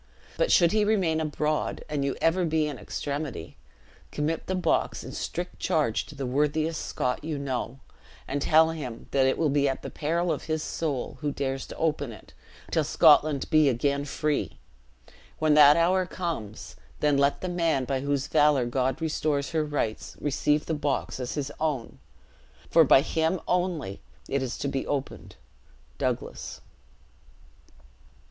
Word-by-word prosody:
But - - +1
should 170 -2 +5
he 215 -1 +3
remain 185 -7 +1
abroad, 155 0 -1
and 150 -2 -2
you 140 -1 -1
ever 175 +3 +3
be 160 -2 +1
in 150 - -5
extremity, 140 - -5 0.6
commit 155 +2 -2
the 185 - -1
box 185 - 0
in - - -8
strict - - -5
charge - - 0
to - - -11
the 135 - -4
worthiest 150 +5 0
Scot 125 +3 -2
you 155 -1 -3
know; 130 -2 -3 0.5
and 140 +1 -2
tell 160 +2 +5
him 130 -8 -6
that 135 -1 +3
it 130 - +1
will 155 -3 +1
be 140 0 +2
at 135 - -4
the - - -6
peril 170 +3 -1
of 150 - -3
his 155 -1 -2
soul, 145 -6 -3
who 145 -1 -1
dares 135 -1 -3
to - - -9
open 150 -5 -1
it, 105 - -14 0.4
till 160 - +2
Scotland 150 -2 +4
be 155 -3 +5
again 140 +3 0
free! 145 - -2 0.8
When 155 -1 +3
that 150 0 +8
hour 180 +2 +2
comes, 160 - -5 0.2
then 150 -1 +3
let 140 0 +2
the 185 - -3
man 165 -7 0
by 135 0 -1
whose 140 0 -1
valor 145 -4 +3
God 130 +3 -1
restores 150 -3 -1
her 160 -2 +1
rights, 145 -7 -3
receive 150 +1 +1
the 160 - -2
box 145 -3 -2
as 125 -1 -4
his 145 -1 -3
own; 150 -7 -2 0.7
for 165 - +7
by 135 -2 +6
him 160 +4 0
only 175 - -1 0.3
it 140 - -1
is 130 -2 -3
to - - -3
be 135 -1 -2
opened. 140 -2 -4 0.6
Douglas.'" - - -3
150 Hz, 165 wpm, -27 LUFS, 135-160 Hz, 0.8 s, that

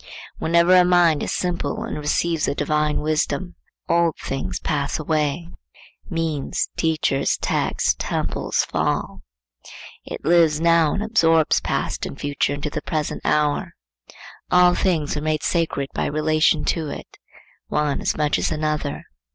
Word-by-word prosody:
Whenever 170 +2 +4
a 180 - +7
mind 175 -4 +4
is - - -2
simple 180 +4 -2
and 230 - -5
receives 160 +2 0
a 140 - -1
divine 150 0 0
wisdom, 155 +4 -1 0.3
old 170 -2 +2
things 95 -10 -4
pass 145 -2 -1
away,—means, 155 - -3
teachers, 155 -4 0
texts, - - 0
temples - - -1
fall; - - -2 0.8
it - - -8
lives 165 -2 +4
now, 165 -2 +4
and 205 - -2
absorbs 165 -8 +3
past - - -2
and 135 - -9
future 145 -1 -1
into 145 +1 -4
the - - -4
present 155 -2 -3
hour. 150 -1 0 0.7
All 180 0 +5
things 165 -7 0
are 150 - -3
made 155 -1 -1
sacred 160 -6 -1
by - - -1
relation 155 +1 +2
to 160 -3 -1
it,—one 150 0 -5
as - - -1
much 150 -1 +1
as - - -1
another. 155 -2 -2
155 Hz, 135 wpm, -22 LUFS, 150-170 Hz, 0.8 s, a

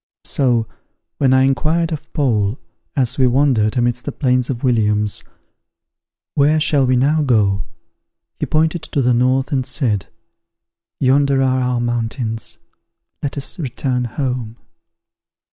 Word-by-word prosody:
So, 120 -5 +1 0.5
when 135 -2 +3
I 130 0 +5
inquired 155 +5 +1
of 155 - -6
Paul, 115 -7 0 0.4
as 130 -2 +1
we 130 - +5
wandered 125 -4 +2
amidst 120 0 0
the - - -2
plains 125 -3 0
of 125 -3 -4
Williams, 105 -4 +1 1.1
"Where 150 +2 +3
shall 150 -3 +2
we 130 - +3
now 145 +5 +2
go?" 105 -8 +2 0.7
he - - -2
pointed 160 +2 +1
to 150 -3 -2
the 125 0 +3
north, 130 +4 +1
and 135 -3 +1
said, 120 - -1 0.9
"Yonder 135 0 +3
are 130 0 +2
our 125 -1 0
mountains; 115 -2 -3 0.6
let 145 0 -4
us 140 +6 -4
return 125 -3 -2
home." 120 -2 -3
130 Hz, 130 wpm, -18 LUFS, 120-140 Hz, 1.1 s, I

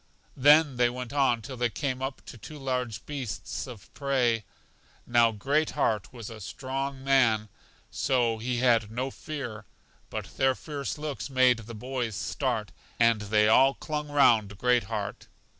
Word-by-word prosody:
Then 145 0 +5
they 120 0 +4
went 125 +1 -6
on 130 -5 +2
till 130 0 -7
they 120 0 +1
came 130 +1 -3
up 135 0 -5
to - - -10
two 150 +8 -10
large 125 -5 -3
beasts 130 -6 -5
of 120 -6 -12
prey. 125 -5 +1 0.6
Now 120 -1 +4
Great 140 +9 0
heart 110 -8 0
was 120 -4 -8
a 110 -1 -9
strong 135 +6 -4
man, 120 -6 +3 0.4
so 120 -4 +1
he 120 +2 -2
had 115 -4 +3
no 130 +4 -3
fear; 120 -10 -6 0.4
but - - -7
their 130 -1 +3
fierce 145 -1 -5
looks 150 -2 -5
made 130 -2 +4
the 115 +1 -9
boys 125 -1 -3
start, - - -2 0.3
and 115 -2 +4
they 105 +1 +3
all 135 +5 +5
clung 150 -1 -4
round 110 -8 +4
Great 125 +1 +2
heart. 105 -2 -5
125 Hz, 160 wpm, -28 LUFS, 115-135 Hz, 0.6 s, Then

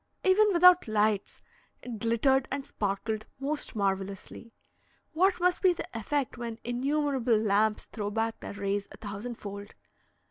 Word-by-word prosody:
Even 395 +3 +5
without 360 -2 +6
lights, 215 -1 0 0.4
it 235 -3 -6
glittered 250 +4 +2
and 275 0 -3
sparkled 215 +2 -3
most 285 -1 -2
marvellously; 195 +2 -3 0.6
what 370 +4 +3
must 360 0 +2
be 370 -2 +5
the - - -6
effect 250 +3 -2
when 230 -2 -5
innumerable 265 -1 +1
lamps 210 0 +1
throw 205 -2 -4
back 225 +1 -2
their - - -7
rays 200 0 -2
a - - -11
thousandfold! 205 -1 -7
230 Hz, 135 wpm, -29 LUFS, 205-280 Hz, 0.6 s, without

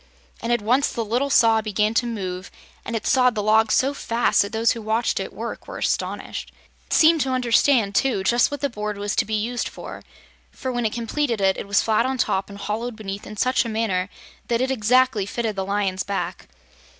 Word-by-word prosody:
And 230 - -2
at 240 -3 +1
once 255 +6 +2
the 230 - -3
Little 245 +6 0
Saw 225 -4 +4
began 215 0 0
to 240 +2 +1
move 185 -5 -5 0.3
and 230 - -4
it 225 - -3
sawed 250 -2 +3
the 210 - -1
log 215 +1 +3
so 270 +2 +2
fast 235 -3 +1
that 200 - -2
those 225 0 +2
who 230 - -4
watched 220 +2 0
it - - -4
work - - -7
were - - -7
astonished. - - -3 0.4
It - - -4
seemed 320 -1 +5
to 265 - 0
understand, 245 -3 +3
too, 240 -3 +1
just 240 +5 +3
what 285 -1 -6
the 285 - +2
board 210 -2 -4
was 205 0 -2
to - - +3
be 220 - -2
used 235 +3 -2
for, - - -9 0.5
for 260 - -5
when 240 -2 0
it - - -2
was - - -8
completed 235 0 -1
it 195 0 +1
was 200 0 +2
flat 225 +2 +2
on 265 0 -2
top 195 -5 0
and 200 - -9
hollowed 220 +4 -4
beneath 200 -2 -7
in 215 - -9
such 255 +5 +2
a 230 - -5
manner 210 -4 -1 0.4
that 235 -1 +1
it 260 +1 0
exactly 250 -2 +2
fitted 225 0 -2
the 195 - -2
Lion's 195 -1 -1
back. 200 +1 -4
225 Hz, 220 wpm, -23 LUFS, 205-245 Hz, 0.5 s, seemed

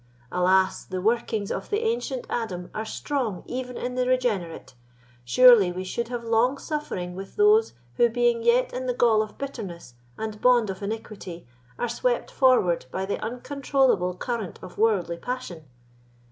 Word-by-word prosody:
Alas! 185 +1 +2
the 185 -1 -5
workings 220 0 0
of - - -4
the 420 +1 0
ancient 450 - -2
Adam 180 -7 -4
are 215 - -3
strong 240 -6 -3
even 250 0 -5
in 250 0 -3
the 250 0 0
regenerate; 220 - -1 0.5
surely 210 - +7
we 185 +1 -5
should 235 +5 -3
have 240 -1 -5
long 230 +4 +2
suffering 270 - -4
with 195 +1 -9
those 425 +2 +4 0.2
who, 240 - +5
being 240 0 +1
yet 235 +2 +3
in 255 +1 -4
the 250 - 0
gall 225 -3 +4
of 215 -1 -6
bitterness 200 - -7 0.2
and 215 -1 -5
bond 240 -5 +4
of 190 - -9
iniquity, 200 -4 -6 0.3
are 240 - -1
swept - - -1
forward 250 - +3
by 190 +8 -3
the 200 - -3
uncontrollable 255 -6 0
current 220 -1 -4
of - - -10
worldly 200 -6 +2
passion. 215 -8 -6
230 Hz, 160 wpm, -25 LUFS, 190-255 Hz, 0.5 s, surely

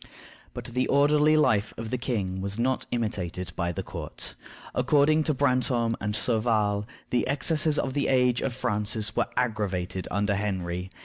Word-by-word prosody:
But - - -6
the 125 +2 -1
orderly 150 +2 +4
life 110 -8 +2
of 115 0 -5
the 125 - 0
king 100 -7 -2
was 100 +1 -2
not 130 +2 0
imitated 90 -7 -3
by 85 -1 -1
the - - -4
court. - - -7 0.4
According 155 +1 +3
to 155 - +2
Brantome 125 -4 +2
and 105 +1 -2
Sauval, 110 -3 +1 0.2
the 125 - +1
excesses 150 +2 +1
of 135 - -1
the 140 0 0
age 125 -2 +3
of 135 - -1
Francis 110 -3 -1
were - - +1
aggravated 100 -6 -1
under 100 +1 0
Henry. 95 -3 -2
115 Hz, 160 wpm, -27 LUFS, 100-130 Hz, 0.4 s, orderly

